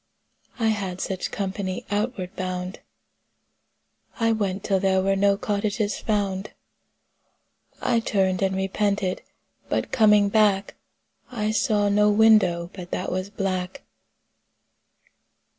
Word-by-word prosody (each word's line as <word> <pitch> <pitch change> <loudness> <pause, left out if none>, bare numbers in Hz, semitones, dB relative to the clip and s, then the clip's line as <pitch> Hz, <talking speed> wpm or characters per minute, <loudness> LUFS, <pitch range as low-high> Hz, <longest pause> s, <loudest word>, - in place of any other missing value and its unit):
I 225 -2 +1
had 195 -4 -2
such 190 -1 -3
company 190 -1 -4
outward 205 -3 -2
bound. 185 0 -4 1.4
I 230 0 +3
went 200 -3 -1
till 195 -2 +1
there 190 -1 +2
were 195 0 +2
no 200 0 +3
cottages 205 +1 -1
found. 200 -2 -2 1.3
I 235 - +2
turned 190 -4 0
and 190 -1 +1
repented, 195 0 -1 0.5
but - - -1
coming 210 -3 +5
back 205 -2 +2 0.6
I 215 -3 -1
saw 215 -3 +1
no 210 +1 +4
window 205 -5 +4
but 180 -2 -9
that 185 - -3
was 185 +2 -3
black. 195 +3 -3
200 Hz, 110 wpm, -24 LUFS, 190-210 Hz, 1.4 s, coming